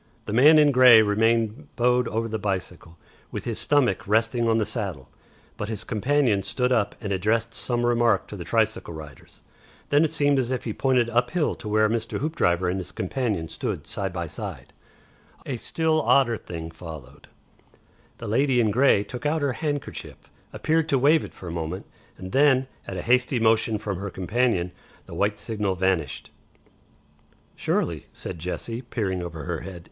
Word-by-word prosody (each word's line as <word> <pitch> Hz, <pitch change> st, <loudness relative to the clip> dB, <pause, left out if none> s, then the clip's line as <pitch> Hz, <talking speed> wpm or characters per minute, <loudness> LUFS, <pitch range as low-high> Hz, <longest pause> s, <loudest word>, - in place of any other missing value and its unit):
The 105 Hz, -, -4 dB
man 145 Hz, +7 st, +7 dB
in 150 Hz, -1 st, +6 dB
grey 125 Hz, -4 st, +8 dB
remained 110 Hz, +1 st, +1 dB
bowed 125 Hz, 0 st, +2 dB
over 115 Hz, +2 st, -2 dB
the 110 Hz, -1 st, -3 dB
bicycle, 90 Hz, -4 st, -4 dB, 0.3 s
with -, -, -5 dB
his 115 Hz, -2 st, -3 dB
stomach 125 Hz, -9 st, +1 dB
resting 115 Hz, +2 st, +2 dB
on 115 Hz, 0 st, +3 dB
the 110 Hz, -, +1 dB
saddle, 95 Hz, -, -4 dB, 0.5 s
but 105 Hz, -, -4 dB
his 110 Hz, -3 st, -5 dB
companion 125 Hz, -2 st, +1 dB
stood 125 Hz, +5 st, -1 dB
up 110 Hz, -5 st, +1 dB
and 105 Hz, -4 st, -3 dB
addressed 115 Hz, +4 st, 0 dB
some 120 Hz, -1 st, -1 dB
remark 120 Hz, -4 st, +2 dB
to -, -, -7 dB
the -, -, -6 dB
tricycle 85 Hz, -, 0 dB
riders. 75 Hz, -4 st, -12 dB, 0.5 s
Then 145 Hz, +2 st, +4 dB
it 160 Hz, -, +2 dB
seemed 145 Hz, -3 st, +2 dB
as 125 Hz, -2 st, -1 dB
if 130 Hz, -1 st, -2 dB
he 110 Hz, -, -3 dB
pointed 125 Hz, -2 st, +2 dB
up 120 Hz, +2 st, +2 dB
hill 170 Hz, -4 st, 0 dB
to 105 Hz, -, -8 dB
where 110 Hz, 0 st, +3 dB
Mr. 115 Hz, 0 st, -2 dB
Hoopdriver 95 Hz, -, 0 dB
and 90 Hz, +2 st, -1 dB
his 90 Hz, -1 st, -7 dB
companion 100 Hz, -4 st, -2 dB
stood -, -, -4 dB
side 95 Hz, -2 st, -3 dB
by 85 Hz, -1 st, -4 dB
side. 75 Hz, -1 st, -7 dB, 0.7 s
A 135 Hz, -, -3 dB
still 160 Hz, +5 st, 0 dB
odder 125 Hz, -2 st, +3 dB
thing 85 Hz, -5 st, -7 dB
followed; 80 Hz, -5 st, -11 dB, 0.9 s
the -, -, -7 dB
lady 130 Hz, +4 st, +2 dB
in 110 Hz, -3 st, +3 dB
grey 125 Hz, -3 st, +4 dB
took 125 Hz, +5 st, -5 dB
out 155 Hz, 0 st, 0 dB
her 140 Hz, -2 st, +1 dB
handkerchief, 145 Hz, +1 st, -4 dB, 0.3 s
appeared 160 Hz, 0 st, 0 dB
to 140 Hz, -, +3 dB
wave 150 Hz, +5 st, +4 dB
it -, -, -9 dB
for 90 Hz, -, -10 dB
a -, -, -4 dB
moment, 85 Hz, +2 st, -4 dB, 0.3 s
and 95 Hz, 0 st, -8 dB
then 135 Hz, -2 st, +4 dB, 0.2 s
at 95 Hz, -, -5 dB
a 90 Hz, -, -4 dB
hasty 125 Hz, +1 st, +2 dB
motion 110 Hz, -1 st, +3 dB
from 100 Hz, -3 st, -4 dB
her 100 Hz, +1 st, -4 dB
companion 95 Hz, -1 st, 0 dB, 0.3 s
the -, -, -11 dB
white 105 Hz, +1 st, 0 dB
signal 105 Hz, -4 st, -2 dB
vanished. 95 Hz, -2 st, -1 dB, 1.2 s
"Surely," -, -, -1 dB
said 85 Hz, -, -7 dB
Jessie, 115 Hz, +8 st, -4 dB
peering 100 Hz, -7 st, -3 dB
under 80 Hz, -3 st, -6 dB
her -, -, -3 dB
hand. 95 Hz, -2 st, -8 dB
115 Hz, 180 wpm, -25 LUFS, 95-125 Hz, 1.2 s, grey